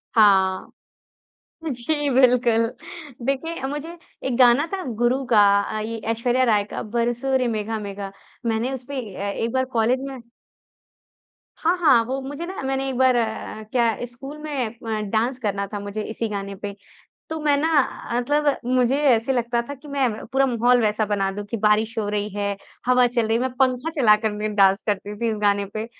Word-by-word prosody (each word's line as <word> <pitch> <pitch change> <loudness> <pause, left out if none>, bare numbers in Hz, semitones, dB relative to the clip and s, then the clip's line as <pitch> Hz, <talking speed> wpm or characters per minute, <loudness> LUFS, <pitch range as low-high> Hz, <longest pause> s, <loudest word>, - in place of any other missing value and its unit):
हाँ। 190 -4 +4 1.0
जी 290 +4 -1
बिल्कुल, 245 -3 +4 0.6
देखिए 275 +4 -2
मुझे 295 +4 -5 0.3
एक 255 -2 0
गाना 250 +4 +6
था 385 -1 -2 0.2
गुरु 250 +3 +2
का, 215 - +6 0.2
अ, 215 - -4
ये 225 +1 -4
ऐश्वर्या 245 +3 +1
राय 210 -4 +3
का - - -3
बरसों 240 +4 0
रे 255 - 0
मेघा 220 0 -2
मेघा। 200 -1 -6 0.4
मैंने 230 +3 0
उसपे 265 +1 -5
अ, 200 +2 -3
एक 230 +3 -2
बार 260 0 +1
कॉलेज 235 +3 +2
में 270 -1 -7 1.4
हाँ, 335 +3 +2
हाँ। 280 -9 +5
वो 260 +3 -2
मुझे 285 +5 -6
न 370 -6 -6
मैंने 270 0 -1
एक 260 - -3
बार 260 -1 +4
अ, 220 -1 -2
क्या 235 -3 +2
स्कूल 270 +5 -9
में 285 -5 -2
अ, 225 -1 -5
डांस 240 +4 0
करना 200 -4 -1
था 205 - -2
मुझे 205 +1 -5
इसी 225 +2 -3
गाने 200 -1 -4
पे, 200 0 -6 0.5
तो 320 - -4
मैं 295 -1 +3
न 290 +3 +1 0.5
मतलब 290 +3 +1 0.2
मुझे 255 +1 +3
ऐसे 235 +2 +2
लगता 240 -1 0
था 285 - -4
कि 285 +2 -15
मैं 260 -6 -1
पूरा 270 +1 +3
माहौल 245 0 +3
वैसा 215 0 +1
बना 200 -2 0
दूँ 205 +1 -5
कि 230 - -1
बारिश 215 +2 +2
हो 210 -2 -1
रही 205 0 -1
है, 200 -1 -1 0.3
हवा 250 0 +5
चल 240 -2 0
रही 225 +1 +2
है, - - -1
मैं 260 -1 -1
पंखा 260 +3 +1
चला 210 -4 +6
कर 220 - +1
मैं 210 0 -3
डांस 195 0 +4
करती 205 0 -2
थी 235 - +1
इस 220 - -2
गाने 200 -1 +2
पे, 215 +1 -3
235 Hz, 185 wpm, -23 LUFS, 215-265 Hz, 1.4 s, गाना